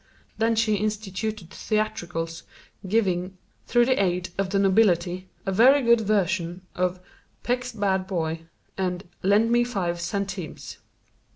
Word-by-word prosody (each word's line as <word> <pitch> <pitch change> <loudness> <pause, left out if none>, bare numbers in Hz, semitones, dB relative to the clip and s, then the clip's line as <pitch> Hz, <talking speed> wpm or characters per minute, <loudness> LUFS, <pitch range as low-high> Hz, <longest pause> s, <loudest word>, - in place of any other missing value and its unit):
Then 225 +1 +2
she 220 -2 +2
instituted 210 -2 -3
theatricals, 175 -7 -2 0.5
giving, 185 -3 0 0.3
through 240 0 +4
the 255 -5 +2
aid 180 -1 -1
of 195 -1 -1
the 195 - 0
nobility, 185 -2 +2 0.2
a 195 - 0
very 255 +8 +6
good 235 -1 +5
version 185 -4 0
of 180 0 -1 0.4
"Peck's 250 +1 -1
Bad 195 -4 0
Boy" 165 -3 -2 0.3
and 180 0 -2
"Lend 210 +4 +3
Me 240 0 +4
Five 180 -8 -2
Centimes." 195 -2 -4
195 Hz, 125 wpm, -25 LUFS, 180-220 Hz, 0.5 s, very